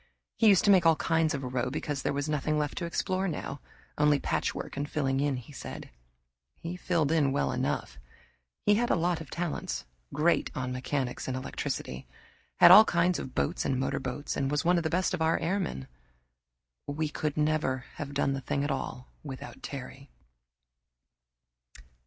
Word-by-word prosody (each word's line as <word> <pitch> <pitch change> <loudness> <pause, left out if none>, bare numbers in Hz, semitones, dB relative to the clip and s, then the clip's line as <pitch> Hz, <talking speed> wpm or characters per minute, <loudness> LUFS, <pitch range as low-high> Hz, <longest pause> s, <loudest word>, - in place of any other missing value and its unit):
He 225 - +3
used 195 -4 +6
to 205 - +6
make 185 -3 +6
all 165 -1 +6
kinds 160 -1 +1
of 135 - -5
a - - -3
row 125 0 -1
because 145 0 -3
there - - 0
was 140 +1 -2
nothing 150 0 0
left 150 -1 -1
to 175 - -3
explore 185 +3 -1
now, 155 -4 -4 0.4
only 150 -1 +5
patchwork - - -2
and 145 +1 -3
filling 135 -3 0
in, 140 -2 +1
he 125 +4 -10
said. - - -8 0.7
He 170 +2 -5
filled 170 -4 0
in 150 -4 +3
well 140 - 0
enough 65 - -2 0.7
he 205 - +5
had 235 +3 +1
a - - +4
lot 170 -1 0
of 160 - -9
talents 145 - -3 0.3
great 165 +3 +2
on 130 -1 -2
mechanics 130 0 -3
and 130 0 -2
electricity. 65 - -4 0.5
Had - - +8
all 215 - +11
kinds 175 -1 +2
of 130 - -7
boats 70 - 0
and 130 - 0
motorcars, 135 +1 -2
and 135 -1 0
was 150 +1 0
one 175 +1 +4
of 170 - 0
the 160 - 0
best 185 +2 +1
of 180 - -2
our 160 +1 +3
airmen. 165 - -2 1.0
We 150 +1 -2 0.2
never 150 -4 0
could - - -19
have 140 -1 -6
done 140 -1 +1
the 135 - -3
thing 140 +2 -1
at 145 - -1
all 130 -1 -4 0.2
without 135 -3 -8
Terry. 135 0 -8
145 Hz, 180 wpm, -29 LUFS, 135-165 Hz, 1.0 s, all